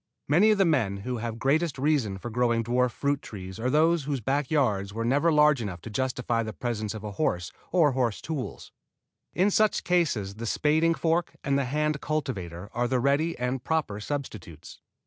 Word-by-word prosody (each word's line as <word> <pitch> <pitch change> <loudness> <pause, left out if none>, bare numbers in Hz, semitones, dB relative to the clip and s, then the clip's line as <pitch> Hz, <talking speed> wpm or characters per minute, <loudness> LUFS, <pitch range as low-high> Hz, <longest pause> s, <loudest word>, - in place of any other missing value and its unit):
Many 175 +10 +5
of 215 - +4
the 195 - +4
men 120 - +1
who 125 -1 -2
have 115 0 -4
greatest 145 +5 +1
reason 130 -8 +1
for 120 +5 -7
growing 115 -1 +1
dwarf 125 +2 +2
fruit 140 +4 -1
trees 95 -1 -8
are 125 +3 0
those 160 +2 +3
whose 140 -2 -1
backyard 135 -2 +1
gardens 100 +1 -7
were 115 0 -2
never 145 +7 +3
large 150 -3 +4
enough 95 -5 -5
to 115 - -8
justify 125 -1 -1
the 110 -1 -4
presence 110 -1 -3
of 110 - -7
a 105 - -5
horse 90 -3 -1 0.2
or 165 -5 +4
horse 125 -5 0
tools. 155 -5 -6 0.6
In 195 +3 +3
such 215 +1 +2
cases 125 - 0
the 115 +1 -4
spading 160 +6 +2
fork 165 +1 0
and 140 -1 +1
the 140 -1 +1
hand 150 +3 -1
cultivator 100 - -3
are 120 +1 0
the 130 +1 +1
ready 140 +6 +1
and 125 0 -2
proper 150 -11 -1
substitutes. 105 - -6
130 Hz, 190 wpm, -27 LUFS, 110-150 Hz, 0.6 s, Many